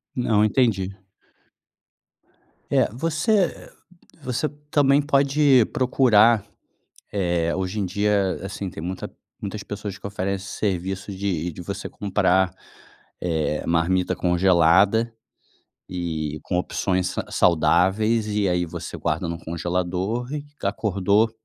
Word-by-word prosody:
Não 110 -4 +2
entendi. 105 -5 +2 1.8
É, - - +4
você, 160 - -1 0.2
eh, - - -12 0.5
você 130 +2 -1 0.2
também 145 -1 +4
pode 140 -3 +4
procurar, 120 -5 +4 0.7
eh, 85 -4 0
hoje 95 +3 -2
em 100 - 0
dia, 100 0 +1
assim, 100 -1 -5
tem 80 - -8
muita 90 +2 -5 0.3
muitas 100 +1 -5
pessoas 105 -1 -6
que 95 - -13
oferecem 100 -1 -3
serviços 95 0 -3
de 90 -4 -2
de 90 - -8
você 100 +2 -5
comprar, 95 -2 +1 0.7
eh, 80 -3 -1
marmita 85 +2 +1
congelada, 95 +5 +3 0.8
e 80 -4 -3
com 90 - -1
opções 90 0 0
sa - - -3
saudáveis 95 +6 +3
e 105 -2 +1
aí 90 0 +1
você 85 0 -7
guarda 85 +1 -2
no 85 0 -4
congelador 90 - -2
e 150 -1 -3 0.2
acordou, 100 +1 +1
95 Hz, 115 wpm, -23 LUFS, 90-110 Hz, 1.8 s, É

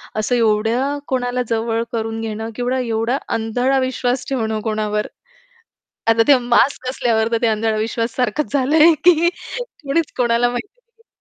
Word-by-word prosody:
असं 215 +3 0
एवढ्या 230 +5 +1
कोणाला 250 -1 -1
जवळ 230 0 0
करून 225 -1 -3
घेणं 220 0 -4
किंवा 250 +1 -1
एवढा 230 +2 -1 0.2
अंधळा 245 +4 0
विश्वास 255 -1 -1
ठेवणं 220 -5 -1
कोणावर. 215 -1 -2 1.0
आता 225 0 +4
ते 280 -2 +7
मास्क 250 +2 +1
असल्यावर 230 -3 0
तर 230 - +2
ते 235 - +3
अंधाळा 220 0 0
विश्वास 230 +1 -2
सारखंच 255 +4 -1
झालंय, 305 +5 +5
की 340 -1 +5
कणीच 335 - -4
कोणाला 240 0 +2
माहिती 395 - -6
नाही. 465 -1 -34
245 Hz, 145 wpm, -19 LUFS, 225-265 Hz, 1.0 s, ते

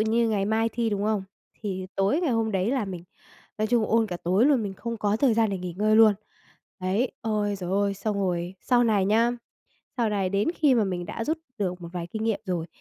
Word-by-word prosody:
như 225 +1 +2
ngày 205 -3 +1
mai 220 +2 +1
thi, 230 -1 0
đúng 205 0 -1
không? 215 -2 0 0.4
Thì 190 -3 -4
tối 195 - +2
ngày 335 -6 +1
hôm 225 -2 0
đấy 190 +3 +1
là 260 -5 0
mình 180 -3 -7 0.5
nói 215 - +1
chung 235 -2 +3
ôn 225 0 +2
cả 180 - -4
tối 185 +8 +2
luôn, 275 -6 +3
mình 195 -2 -4
không 230 +4 -5
có 205 0 +1
thời 240 -1 +3
gian 225 -2 +2
để 195 - -2
nghỉ 180 -1 -6
ngơi 215 +1 +3
luôn, 220 -2 +7 0.7
đấy. 195 +7 0
Ôi, 210 -3 -1
giời 180 -2 -5
ơi! 200 +1 +1
Xong 205 +1 -2
rồi 180 -2 -1
sau 245 -1 +3
này 205 -4 +2
nhá, 230 +3 +3 0.7
sau 235 -3 +1
này 195 -3 0
đến 200 - 0
khi 290 -4 +4
mà 225 -4 +3
mình 175 -2 -3
đã 225 - -4
rút 315 +4 -1 0.2
được 180 -3 -2
một 170 - -7
vài 175 -2 -4
kinh 220 +4 -4
nghiệm 225 -3 0
rồi 175 -3 -2
210 Hz, 240 wpm, -26 LUFS, 190-225 Hz, 0.7 s, luôn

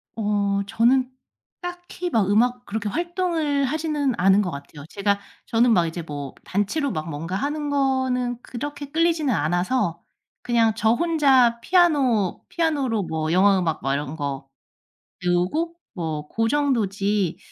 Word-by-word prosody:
어 205 -2 0
저는 240 +4 +3 0.5
딱히 355 0 -5
막 215 - +1
음악 245 +4 +2
그렇게 210 0 -3
활동을 335 - -1
하지는 295 -1 -1
않은 195 +2 +4
것 185 -3 -2
같아요. 145 0 -9
제가 200 0 0 0.3
저는 235 +1 +3
막 175 -6 +4
이제 165 +1 -5
뭐 145 -4 -6
단체로 205 +9 -1
막 155 -2 -4
뭔가 165 +4 -4
하는 295 +7 -2
거는 260 -3 0
그렇게 285 +3 -6
끌리지는 325 -4 +2
않아서 175 - 0 0.4
그냥 230 -2 +2
저 220 -1 +2
혼자 270 -5 +3
피아노 270 - +2
피아노로 280 - 0
뭐 160 -2 -2
영화 195 +3 +5
음악 165 -3 -1
막 135 - +1
이런 145 +1 -3
거 140 -3 -4 0.8
배우고 180 - 0 0.2
뭐 155 -5 -4
고 225 +6 0
정도지 210 - 0
225 Hz, 275 characters per minute, -23 LUFS, 180-285 Hz, 0.8 s, 영화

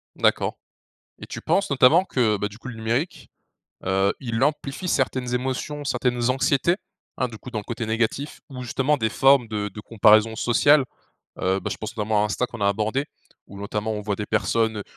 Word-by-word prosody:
D'accord. - - +1 0.6
Et - - -8
tu - - -7
penses, 195 -3 +1
notamment 140 +7 +5
que, 115 - +1
bah, 105 - -1
du 105 +1 -13
coup, - - -10
le 125 - -6
numérique, 115 +9 -2 0.6
heu, 95 +1 +2
il 115 -3 -3
amplifie 150 +4 -1
certaines 130 -4 0
émotions, 130 +4 -3
certaines 120 -2 0
anxiétés? 140 +6 +2 0.4
Hein, 125 - 0
du 110 -2 -10
coup, 125 - -10
dans 110 - -3
le - - -13
côté 115 0 -4
négatif 115 +6 -1
ou 130 -2 -7
justement 135 +5 +1
des 110 -4 0
formes 135 -3 +4
de 105 -1 -2
de 105 - -9
comparaison 110 +1 +4
sociale? 135 +4 +4 0.5
Heu, 95 +1 +1
bah, - - -4
je - - -5
pense 110 +1 -6
notamment 105 0 +1
à - - +2
Insta, 115 +4 -1
qu'on 120 -3 -10
a 100 - +3
abordé 110 +8 0 0.4
où 100 - -11
notamment 105 +2 -3
on 105 -1 -4
voit 105 0 -1
des 105 - -4
personnes 110 0 0
115 Hz, 195 wpm, -24 LUFS, 105-135 Hz, 0.6 s, notamment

